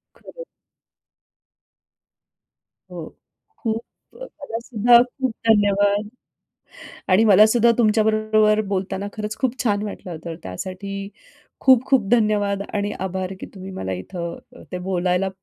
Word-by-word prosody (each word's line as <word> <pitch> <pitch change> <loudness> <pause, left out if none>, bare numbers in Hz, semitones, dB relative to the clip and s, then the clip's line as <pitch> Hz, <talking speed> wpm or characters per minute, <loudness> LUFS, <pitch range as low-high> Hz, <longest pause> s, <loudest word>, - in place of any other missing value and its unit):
खरं. - - -11 2.5
हो. - - -8 0.4
खूप 225 - -2 0.4
अ, - - -5
तुम्हाला 285 - -7
सुद्धा, 235 0 +5
खूप 260 0 -4 0.2
धन्यवाद. 205 -1 +3 1.0
आणि 190 +4 +5
मला 210 0 +7
सुद्धा 235 -1 +5
तुमच्या 220 -2 +3
बरोबर 215 0 +3
बोलताना, 195 0 -3
खरंच 215 0 -4
खूप 260 -1 -1
छान 205 -4 +1
वाटलं 200 -3 -7
होतं, 165 0 -7
त्यासाठी 195 - -6 0.5
खूप-खूप 260 -3 +4
धन्यवाद 210 -4 +2
आणि 205 0 -1
आभार, 190 0 -3
की - - -6
तुम्ही 190 0 -8
मला 95 - -5
इथं 170 - -8
ते 180 - -3
बोलायला 180 +1 0
205 Hz, 115 wpm, -22 LUFS, 190-225 Hz, 2.5 s, मला